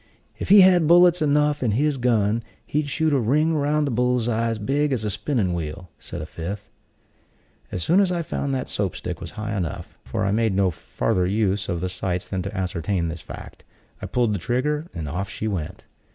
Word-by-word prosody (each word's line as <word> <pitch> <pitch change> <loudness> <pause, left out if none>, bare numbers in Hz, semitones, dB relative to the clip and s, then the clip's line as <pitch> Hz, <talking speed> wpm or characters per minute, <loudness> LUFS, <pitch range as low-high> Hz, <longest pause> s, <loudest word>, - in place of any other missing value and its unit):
"If - - -4
he 200 0 +9
had 180 -4 +6
bullets 175 +1 +6
enough 150 0 +2
in 115 -5 +1
his 145 +4 +1
gun, 115 -2 +2 0.2
he'd 150 0 -1
shoot 155 +2 +1
a 140 - +3
ring 150 +8 +2
round 150 0 +1
the 140 - -1
bull's 125 0 +1
eye 115 0 +1
big 140 +7 0
as 120 -5 -1
a 105 - -1
spinning 105 -7 0
wheel," 85 +1 -5
said - - -7
a - - -5
fifth. 95 +6 -6 1.0
As 90 - -2
soon 180 +4 +4
as 195 -2 +3
I 170 -1 -1
found 140 -2 -3
that 130 - -3
Soap 100 -3 -2
stick 90 - -5
was 85 - -6
high 110 0 -3
enough 90 -6 -5
(for - - -2
I 100 - +1
made 110 -2 +1
no 95 -2 +3
farther 90 +3 -1
use 100 0 0
of 85 -2 -2
the 90 - -1
sights 90 -1 -3
than 95 -2 -2
to 100 +1 -5
ascertain 90 -1 -1
this 80 -1 -6
fact), - - -10 0.4
I - - -4
pulled 115 -5 +1
trigger, 150 - -1
and 80 -3 -5
off 90 +7 -3
she 110 - -4
went. 90 -8 -4
110 Hz, 210 wpm, -23 LUFS, 95-145 Hz, 1.0 s, he